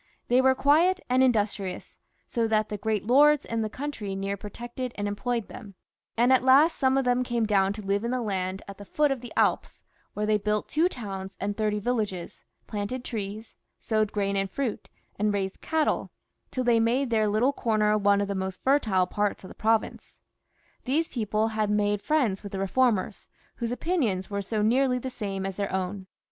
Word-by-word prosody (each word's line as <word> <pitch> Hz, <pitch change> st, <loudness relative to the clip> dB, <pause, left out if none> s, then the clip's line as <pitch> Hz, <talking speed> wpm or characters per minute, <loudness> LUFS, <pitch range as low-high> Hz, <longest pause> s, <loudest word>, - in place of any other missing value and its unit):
They 250 Hz, +2 st, +5 dB
were 260 Hz, 0 st, +4 dB
quiet 325 Hz, +8 st, +4 dB
and 255 Hz, +1 st, +4 dB
industrious, 210 Hz, -6 st, 0 dB, 0.3 s
so 230 Hz, -1 st, -1 dB
that 215 Hz, -1 st, +1 dB
the 210 Hz, -, -3 dB
great 215 Hz, -1 st, -1 dB
lords 290 Hz, +4 st, +5 dB
in 230 Hz, 0 st, -2 dB
the 215 Hz, -, -2 dB
country 225 Hz, -6 st, -5 dB
near 195 Hz, +1 st, -2 dB
protected 240 Hz, +5 st, -6 dB
and 205 Hz, 0 st, -2 dB
employed 230 Hz, +2 st, -2 dB
them, 210 Hz, -6 st, -11 dB, 0.4 s
and 245 Hz, +3 st, +5 dB
at 255 Hz, -, +4 dB
last 280 Hz, +6 st, +6 dB
some 265 Hz, -1 st, +3 dB
of 270 Hz, -, +1 dB
them 245 Hz, 0 st, +2 dB
came 240 Hz, -2 st, 0 dB
down 195 Hz, -2 st, +2 dB
to 210 Hz, 0 st, -8 dB
live 200 Hz, +2 st, 0 dB
in 235 Hz, -, -1 dB
the 255 Hz, +1 st, 0 dB
land 190 Hz, -2 st, -2 dB
at 200 Hz, 0 st, -10 dB
the -, -, -8 dB
foot 295 Hz, +6 st, +1 dB
of 265 Hz, -3 st, -2 dB
the 245 Hz, -, -9 dB
Alps, -, -, +1 dB, 0.3 s
where 210 Hz, -, -1 dB
they 210 Hz, 0 st, +2 dB
built 210 Hz, +1 st, -1 dB
two 330 Hz, +4 st, +2 dB
towns 195 Hz, -, -7 dB
and 200 Hz, +1 st, -2 dB
thirty 210 Hz, -1 st, 0 dB
villages, 210 Hz, -6 st, -3 dB, 0.2 s
planted 220 Hz, +5 st, -4 dB
trees, 215 Hz, -1 st, -5 dB, 0.3 s
sowed 215 Hz, -2 st, 0 dB
grain 200 Hz, -1 st, -1 dB
and 195 Hz, 0 st, 0 dB
fruit, 255 Hz, 0 st, -3 dB, 0.3 s
and 210 Hz, 0 st, +2 dB
brought 200 Hz, -1 st, 0 dB
up 190 Hz, -, -10 dB
cattle, 315 Hz, -1 st, 0 dB, 0.4 s
till 255 Hz, -, -2 dB
they 240 Hz, -2 st, +4 dB
made 240 Hz, +3 st, +1 dB
their 215 Hz, -2 st, +3 dB
little 220 Hz, +7 st, +2 dB
comer 215 Hz, -4 st, +1 dB
one 200 Hz, -1 st, +3 dB
of 200 Hz, -, -1 dB
the 200 Hz, -, -2 dB
most 190 Hz, -1 st, -4 dB
fertile 220 Hz, -10 st, +3 dB
parts 205 Hz, +2 st, -2 dB
of 185 Hz, -, -9 dB
the -, -, -10 dB
province. 220 Hz, 0 st, -1 dB, 0.7 s
These 305 Hz, +6 st, 0 dB
people 215 Hz, -1 st, 0 dB
had 215 Hz, -1 st, -1 dB
made 205 Hz, -1 st, +1 dB
friends 255 Hz, -11 st, +1 dB
with 200 Hz, -1 st, -9 dB
the 195 Hz, -, -3 dB
reformers, 215 Hz, 0 st, 0 dB, 0.3 s
whose 235 Hz, -1 st, -3 dB
opinions 245 Hz, -, -1 dB
were 200 Hz, 0 st, -1 dB
so 210 Hz, +2 st, -2 dB
nearly 250 Hz, +3 st, +3 dB
the 260 Hz, +1 st, -5 dB
same 195 Hz, -5 st, -4 dB
as 195 Hz, -1 st, -4 dB
their 200 Hz, -1 st, -2 dB
own. 190 Hz, +1 st, -3 dB
215 Hz, 200 wpm, -27 LUFS, 200-250 Hz, 0.7 s, last